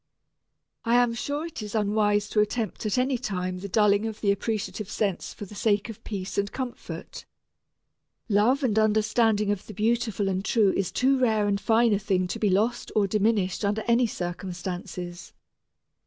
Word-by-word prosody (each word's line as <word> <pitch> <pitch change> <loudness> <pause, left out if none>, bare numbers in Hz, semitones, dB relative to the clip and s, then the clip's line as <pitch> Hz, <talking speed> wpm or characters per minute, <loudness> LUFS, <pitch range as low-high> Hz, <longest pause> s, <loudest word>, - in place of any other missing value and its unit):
I 230 +1 +2
am 245 -1 +4
sure 285 +6 -3
it 335 -8 -7
is 210 0 -6
unwise 205 -1 +2
to 215 - +1
attempt 215 +1 -1
at 210 - 0
any 255 0 +1
time 185 -5 -3
the 200 +2 -6
dulling 210 +1 +3
of 220 -1 -6
the 200 - +2
appreciative 215 0 -3
sense 195 -5 -2
for 205 - -8
the 200 - -13
sake 205 +1 +1
of 220 - -9
peace 195 -2 -4
and 200 0 -1
comfort. 255 -2 -7 1.0
Love 235 +7 +3
and 220 -4 +2
understanding 215 -1 +2
of 205 -2 -4
the 215 - -9
beautiful 220 -1 0
and 190 0 -1
true 215 -2 +3
is 195 - -1
too 265 +1 +2
rare 220 -4 +2
and 200 0 0
fine 230 0 +3
a 200 - +2
thing 190 -2 0
to - - -4
be 210 - +2
lost 220 +6 0
or 210 -2 +4
diminished 205 -1 +1
under 205 +2 0
any 235 +1 +4
circumstances. 180 -1 -6
210 Hz, 175 wpm, -26 LUFS, 200-230 Hz, 1.0 s, am